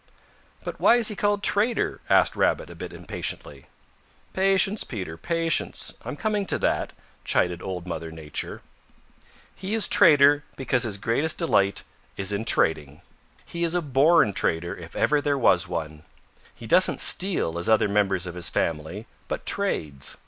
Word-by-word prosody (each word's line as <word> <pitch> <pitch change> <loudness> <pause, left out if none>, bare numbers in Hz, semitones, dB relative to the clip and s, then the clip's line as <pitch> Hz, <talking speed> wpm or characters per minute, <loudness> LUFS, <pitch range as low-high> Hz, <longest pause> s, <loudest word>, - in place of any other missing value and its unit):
"But - - -7
why - - +5
is 240 -3 +3
he 210 - -5
called 205 0 -1
Trader?" 220 +4 +1
asked - - +4
Rabbit - - 0
a - - -11
bit - - -8
impatiently. - - -6 0.7
"Patience, 195 +2 +1
Peter, 95 -8 -7
patience. 165 - -1
I'm - - -6
coming 210 -3 -2
to - - -1
that," - - -1 0.3
chided 90 -1 0
Old 90 -2 -6
Mother 85 -2 -6
Nature. 80 -2 -6 0.9
"He 195 +4 -5
is 225 - +4
Trader 145 -5 +5
because 125 -2 +1
his 105 -3 -3
greatest 135 +10 0
delight 100 - +1 0.3
is 100 +1 -1
in 105 +3 -3
trading. 75 -8 +1 0.4
He 170 0 -5
is 170 0 0
a 175 - +1
born 140 -4 +3
trader 85 -1 -1
if 85 -1 -12
ever 150 -1 +1
there 145 -1 0
was 100 -7 +3
one. 80 -3 -6 0.5
He - - -12
doesn't - - +3
steal 170 - +3
as 85 - -1
other 110 -1 +3
members 100 -3 0
of 90 - -6
his 90 0 0
family 80 +6 -3 0.2
but - - -5
trades. 70 -3 -1
110 Hz, 155 wpm, -24 LUFS, -, 0.9 s, why